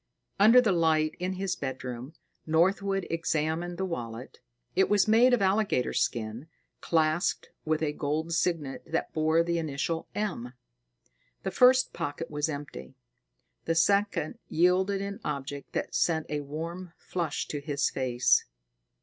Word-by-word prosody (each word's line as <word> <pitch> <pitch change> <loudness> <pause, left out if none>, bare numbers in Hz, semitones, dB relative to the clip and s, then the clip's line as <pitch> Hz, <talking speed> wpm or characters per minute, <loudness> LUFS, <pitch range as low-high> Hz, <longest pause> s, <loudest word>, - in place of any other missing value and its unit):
Under 225 +5 +8
the 230 -5 +3
light 160 -3 +2
in 180 +1 -2
his 190 -1 -2
bedroom, 130 +1 -6 0.3
Northwood 195 +4 +2
examined 165 +1 -1
the 190 - -1
wallet. 120 -8 -6 0.4
It 190 - +3
was 205 0 +3
made 230 +4 +5
of 245 -5 +3
alligator 195 -9 +1
skin, 115 +5 -2 0.3
clasped 160 +2 0
with 155 0 0
a 150 -1 0
gold 155 +3 -2
signet 165 -5 -1
that 165 - -2
bore 160 +1 +3
the 170 0 -1
initial 160 +1 -3
M. 170 - -3 0.9
The - - -2
first 255 +1 +5
pocket 145 +3 -4
was 150 +1 -1
empty; 145 -2 -7 0.7
the 165 - 0
second 200 -1 +1
yielded 185 +4 +2
an 200 0 -5
object 140 -1 -5
that - - -3
sent 160 -2 +1
a 150 - -1
warm 165 +5 -6
flush 170 -5 -3
to 145 - -3
his 140 -1 -1
face. 125 -2 +2
165 Hz, 140 wpm, -28 LUFS, 145-190 Hz, 0.9 s, Under